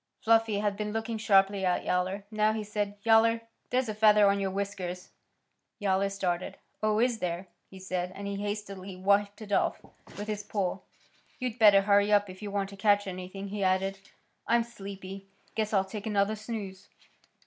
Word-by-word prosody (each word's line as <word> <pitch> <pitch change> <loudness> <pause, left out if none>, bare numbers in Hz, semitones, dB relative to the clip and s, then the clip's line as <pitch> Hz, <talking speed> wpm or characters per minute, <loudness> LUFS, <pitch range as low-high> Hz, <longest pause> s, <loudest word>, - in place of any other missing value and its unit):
Fluffy 225 -2 +3
had 205 -1 0
been 210 0 -3
looking 225 0 -3
sharply 195 -2 +3
at 180 -1 +1
Yowler. 185 +2 0
Now 215 0 +2
he 220 -1 -3
said, 205 -1 -3
"Yowler, 230 0 +5 0.3
there's 250 0 +1
a 215 - -2
feather 210 -1 +6
on 200 0 +3
your 195 -1 0
whiskers." 190 -2 -4 0.7
Yowler 195 -1 +1
started. 185 -3 -2 0.2
"Oh, 215 0 +2
is 240 -1 +2
there?" 180 0 -3 0.2
he 190 - -12
said, 185 -1 -3
and 200 - -7
he 200 0 -3
hastily 200 -2 -5
wiped 200 +3 +1
it 205 - -10
off - - +1 0.4
with 205 - -4
his 210 -1 -2
paw. 200 -3 -2 0.6
"You'd 250 -1 -4
better 205 -3 +8
hurry 205 +1 +4
up 205 -2 +3
if 185 - -13
you 210 - -5
want 200 -1 -2
to 200 - -10
catch 205 0 +3
anything." 190 +1 -6
He 205 0 -3
added. 190 +1 +1 0.5
"I'm 235 0 +3
sleepy. 195 -3 -9 0.3
Guess 215 -1 -1
I'll 195 -2 +2
take 205 +2 -6
another 205 0 +1
snooze." 210 -3 -7
200 Hz, 180 wpm, -29 LUFS, 195-215 Hz, 0.7 s, better